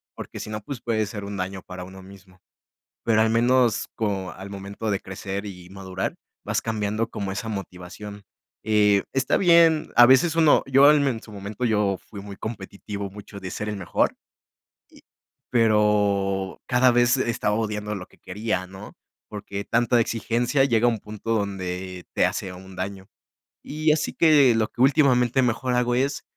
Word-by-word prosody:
Porque - - -8
si - - -6
no, 105 0 -5
pues, 125 +2 -7
puede 110 -2 0
ser 100 0 -7
un 100 0 -6
daño 95 +1 -4
para 90 -1 -9
uno 95 +1 -11
mismo. 95 -1 -16 0.6
Pero 110 -1 +3
al 110 - +3
menos 120 0 +2
co 100 -4 -2
al 95 +1 -10
momento 100 +2 -5
de 100 - 0
crecer 95 +1 -6
y 90 -3 -9
madurar 95 -1 -5 0.3
vas - - -1
cambiando 110 0 -2
como 100 -2 -4
esa 100 +4 -4
motivación, 100 +1 -7 0.4
eh, 105 -2 +3
está 135 -1 +1
bien, 165 -3 +4
a 120 0 +9
veces 130 +6 +4
uno 160 -3 +5
yo, 135 +1 +5
al 150 -1 +5
men 135 -3 +1
en 110 - -8
su 110 - -13
momento 100 +3 -7
yo 105 -4 +1
fui 100 -2 -9
muy 100 0 -9
competitivo, 100 -1 -6
mucho 100 +1 -11
de 95 -2 -7
ser 105 - -4
el 105 - -4
mejor. 90 -3 0 0.7
Y - - -19 0.5
pero 105 -4 +2
cada 125 0 +4
vez 120 +2 +3
estaba 110 -4 0
odiando 105 -1 -2
lo 90 -2 -7
que - - -24
quería, 95 -1 -3
¿no?, 95 +1 -11 0.3
porque 100 -1 -6
tanta 120 +1 +2
exigencia 115 +4 +1
llega 120 -3 +2
a - - +6
un 115 -3 -2
punto 110 +2 -6
donde 95 -3 -4
te - - +3
hace 95 -1 -3
un 95 +1 -12
daño. 95 +1 -5 0.6
Y, 155 +1 0
así 150 - -1
que, 145 -7 +5
lo 110 -1 +1
que - - -12
últimamente 130 -2 +4
mejor 125 +1 0
hago 125 0 +1
es. 135 +3 0
105 Hz, 180 wpm, -24 LUFS, 100-120 Hz, 0.7 s, a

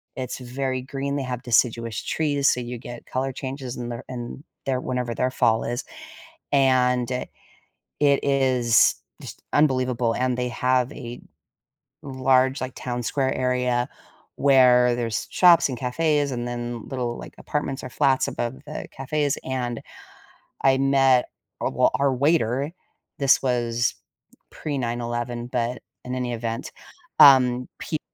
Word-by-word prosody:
It's 130 -1 -4
very 130 +1 -3
green, 140 +1 -3
they 140 - -2
have 125 -1 -4
deciduous 115 -2 +1
trees, 145 -3 0
so 125 - +1
you 120 0 -5
get 120 0 -10
color 130 +1 -2
changes 130 -1 -6
in 120 -1 -5
their 120 0 -6
in 125 +3 -7 0.2
their 130 -1 +1
whenever 125 -2 -3
their 125 0 0
fall 115 -3 +2
is. 120 +1 -3 0.7
And, 125 -2 +3 0.9
it 140 -1 +4
is 130 -4 +3 0.3
just - - -10
unbelievable, 130 -5 +2
and 125 +1 0
they 125 0 -1
have 125 +1 +1
a 120 -3 -8 0.8
large, 130 -1 +2
like, 130 0 -4
town 120 -1 -4
square 130 +3 0
area 125 -1 0 0.5
where 125 -3 +5
there's 115 -4 -2
shops 175 -4 +6
and 130 -3 -5
cafes, 145 +3 0
and 120 -1 -3
then 120 -1 -5
little, 125 -3 -3
like, - - -10
apartments 140 -2 -3
or 130 - -6
flats 135 -1 +2
above 120 +2 -3
the 150 - -6
cafes. 145 +1 -1
And 125 -3 -3 0.8
I 135 0 +5
met 135 -2 +4 0.4
a - - -1
w - - +2
our 140 -1 +2
waiter. 140 0 +1 0.5
This 140 -2 +4
was 120 -2 0 0.6
pre-9/11, 120 -3 -3
but 125 0 -2 0.2
in 125 - -4
any 125 -1 -2
event. 115 0 -4 0.5
Um, 125 -3 +7
peop 155 - -3
125 Hz, 140 wpm, -24 LUFS, 120-135 Hz, 0.9 s, Um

